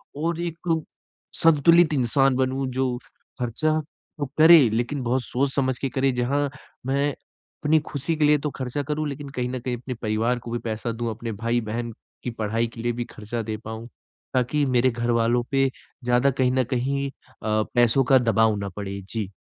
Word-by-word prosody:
और 165 +3 -1
एक 170 -1 -1 0.7
संतुलित 165 +1 +6
इंसान 135 0 +3
बनूँ 130 +1 0
जो 130 -1 0 0.4
खर्चा 155 +6 0 0.4
तो 145 - 0
करे 165 +2 +9
लेकिन 120 +5 -1
बहुत 125 +2 +1
सोच-समझ 130 -1 0
के 135 - -1
करे 135 +1 +1
जहाँ 140 +4 0 0.4
मैं 140 +2 +1
अपनी 155 +3 -2
खुशी 145 +3 -2
के 155 - 0
लिए 150 0 +5
तो 150 +1 -2
खर्चा 130 +2 -2
करूँ 150 +1 -2
लेकिन 140 0 -6
कहीं 125 0 0
न 130 0 -3
कहीं 125 0 -3
अपने 125 +2 -6
परिवार 115 +3 0
को 115 0 -8
भी 120 - -1
पैसा 110 +1 -2
दूँ 115 0 -3
अपने 115 +1 -5
भाई-बहन 115 0 -1 0.3
की 125 - -2
पढ़ाई 110 +2 0
के 115 - -6
लिए 120 0 0
भी 120 0 -3
खर्चा 110 +2 -4
दे 110 -1 -4
पाऊँ, 110 +1 -6 0.5
ताकि 130 +3 +1
मेरे 130 -1 +3
घरवालों 120 0 +1
पे 135 -1 +3 0.3
ज़्यादा 125 +3 +3
कहीं 130 -1 +1
न 130 0 +2
कहीं 140 +2 -1
अ, 110 -4 -3
पैसों 120 +2 +4
का 135 +1 +5
दबाव 110 -2 +3
ना 100 -1 -4
पड़े। 100 -1 -4
जी। 110 -4 -3
125 Hz, 180 wpm, -24 LUFS, 115-140 Hz, 0.7 s, करे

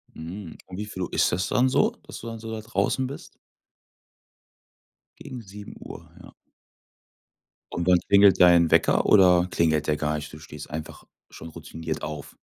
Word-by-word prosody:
Mhm, 85 +2 -8
um 95 0 -10
wie 105 - -4
viel 95 -3 -6
Uhr - - -7
ist - - +2
das 90 +3 -1
dann 130 +1 +2
so, - - +2
dass - - -10
du 115 - -9
dann 115 -1 -7
so 115 0 -8
da 110 -1 -5
draußen 120 +3 -1
bist? 140 - -10 1.8
Gegen 125 -2 -9
7:00, 100 0 -11
ja. - - -15 1.4
Und 85 - -3
wann 90 -1 +5
klingelt 100 -1 +5
dein 85 -2 +6
Wecker - - +3
oder 90 -3 +5
klingelt 80 -3 +1
der 75 - +2
gar 75 0 -1
nicht? 75 0 -7
Du 75 - -10
stehst 75 -1 -11
einfach 75 +1 -7 0.3
schon 80 - -11
routiniert 80 -1 -7
auf. 75 -2 -7
90 Hz, 170 wpm, -25 LUFS, 80-105 Hz, 1.8 s, dein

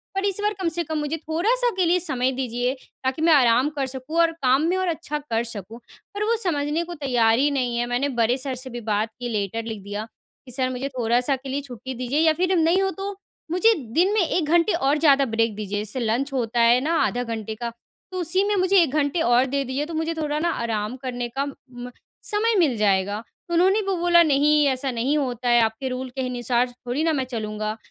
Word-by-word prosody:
पर 390 +1 0
इस 400 -1 0
बार 420 +1 +1
कम 360 - 0
से 345 - 0
कम 315 0 -3
मुझे 295 +2 -2
थोड़ा-सा 390 +11 +1
के 370 -2 +2
लिए 350 +2 +3
समय 265 -7 0
दीजिए, 250 -1 -1 0.3
ताकि 260 +3 -1
मैं 325 0 +5
आराम 250 0 +4
कर 275 - 0
सकूँ 265 +5 -6
और 335 -1 +4
काम 260 +2 +4
में 365 - +1
और 375 0 0
अच्छा 320 -3 -3
कर 225 0 +1
सकूँ।" 215 +3 -9 0.3
पर 410 +1 -2
वो 455 +2 +2
समझने 300 -2 0
को 350 +1 -7
तैयार 245 -7 +2
ही 285 +2 +3
नहीं 250 -4 -1
है, 240 - 0
मैंने 245 +4 -1
बड़े 230 +3 +3
सर 265 0 -3
से 255 +1 -7
भी 240 -1 -6
बात 210 +2 +1
की, 245 -1 -4
लेटर 215 0 -2
लिख 220 -3 -6
दिया 205 +2 -5 0.4
कि, 250 - -10
"सर 255 +1 0
मुझे 255 +2 -3
थोड़ा-सा 245 +3 +2
के 265 +1 -9
लिए 275 +2 -2
छुट्टी 260 -1 -8
दीजिए 255 +4 -1
या 320 0 +4
फिर 365 +3 +1
नहीं 335 +3 +3
हो 385 0 +1
तो 400 +1 -4 0.4
मुझे 440 +6 +4 0.2
दिन 365 +6 +3
में 430 - +3
1 345 -1 0
घंटे 340 +6 +3
और 285 -2 +2
ज़्यादा 280 -3 +4
ब्रेक 225 -2 0
दीजिए। 205 -1 -4
जैसे 210 +5 -4
लंच 240 +4 -1
होता 240 -2 -1
है 235 +1 +5
ना 315 +5 0
आधा 245 +1 -1
घंटे 220 -2 -5
का, 235 +1 -4 0.4
तो 370 - -4
उसी 360 +3 +1
में 415 +1 +1
मुझे 375 +1 +3
1 320 -6 +1
घंटे 290 +2 +1
और 245 -2 +4
दे 275 +1 -1
दीजिए, 265 +3 -2
तो 330 - -8
मुझे 320 +1 -1
थोड़ा 300 -2 -2
ना 340 +2 +1
आराम 220 0 -2
करने 245 -2 -4
का 275 - +1
म 250 -3 -10 0.3
समय 445 +2 +1
मिल 295 -8 +3
जाएगा।" 200 0 +1 0.3
तो - - -3
उन्होंने 380 +5 +4
वो 390 - +1
बोला, 345 0 +5
"नहीं, 300 0 +3
ऐसा 265 0 -1
नहीं 250 +5 0
होता 250 -3 -2
है, 240 0 +5
आपके 225 +4 -1
रूल 255 +1 -4
के 265 +2 -5
अनुसार 245 0 0
थोड़ी 245 +4 -4
ना 325 -1 +2
मैं 270 -3 0
चलूँगा।" 215 -3 -4
270 Hz, 235 wpm, -23 LUFS, 240-330 Hz, 0.4 s, मैं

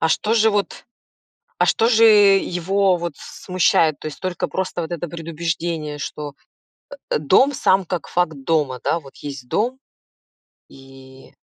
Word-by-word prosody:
А 160 - +2
что 215 +7 +1
же 220 -1 +4
вот 205 -1 -2 0.7
а - - +3
что 225 - +2
же 230 -1 +4
его 195 -3 +4
вот 170 0 -4
смущает? 165 -4 0
То - - -7
есть 155 - -7
только 185 -2 -3
просто 185 -2 -3
вот 160 - -6
это 175 0 -4
предубеждение, 165 -2 -4
что, 145 0 -6 0.8
э, - - 0
дом, 190 - +4
сам 190 -6 +2
как 175 -1 -4
факт 175 -3 0
дома. 145 -6 0
Да? 170 - 0
Вот 135 -2 -16
есть 135 -4 -8
дом 250 +5 -1 0.9
и 135 0 -16
170 Hz, 150 wpm, -21 LUFS, 150-195 Hz, 0.9 s, же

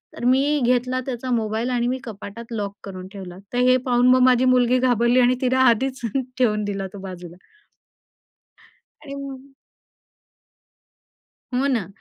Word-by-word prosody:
तर - - -8
मी 275 +4 +3
घेतला 250 +1 +1
त्याचा 255 -1 -5
मोबाईल 225 +1 -1
आणि 240 -1 0
मी 255 - -1
कपाटात 225 0 -9
लॉक 205 -3 -4
करून 185 -2 -8
ठेवला. 185 -3 -9 0.2
तर - - -1
हे 255 - +5
पाहून 245 -1 +3
मग 255 0 +5
माझी 250 0 +3
मुलगी 250 0 +3
घाबरली 245 0 +3
आणि 250 0 +4
तिला 260 0 +1
आधीच 260 +4 0 0.4
ठेवून 210 -4 +2
दिला 195 -1 -3
तो 200 - -8
बाजूला. 180 -3 -9 1.7
आणि 280 -2 -8
म 275 -1 -9 2.0
हो 260 +3 +1
ना. 230 -10 0
245 Hz, 145 wpm, -22 LUFS, 210-255 Hz, 2.0 s, हे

